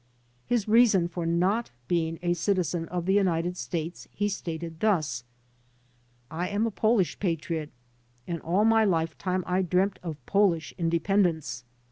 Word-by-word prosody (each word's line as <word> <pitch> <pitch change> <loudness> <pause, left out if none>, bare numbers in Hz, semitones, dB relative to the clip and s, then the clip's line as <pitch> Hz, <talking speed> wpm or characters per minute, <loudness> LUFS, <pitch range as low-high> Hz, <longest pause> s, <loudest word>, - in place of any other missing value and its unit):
His 235 -4 +1
reason 215 -6 +5
for 170 -1 -4
not 185 +7 +1 0.2
being 165 -2 0
a 175 0 +2
citizen 175 -2 0
of 175 -1 -3
the 190 - +2
United 180 -3 +1
States 170 -1 -5
he 205 0 -1
stated 165 -4 -5
thus: 155 - +1 1.1
"I 175 +3 -2
am 205 +2 0
a 225 - -1
Polish 215 -6 +1
Patriot 165 -4 -2 0.6
and 170 +1 -4
all 185 +6 +2
my 225 0 +5
lifetime 175 0 0
I 180 +1 +1
dreamt 190 +2 +1
of 165 -4 -5
Polish 195 -6 +2
independence. 170 -5 0
175 Hz, 140 wpm, -27 LUFS, 165-200 Hz, 1.1 s, reason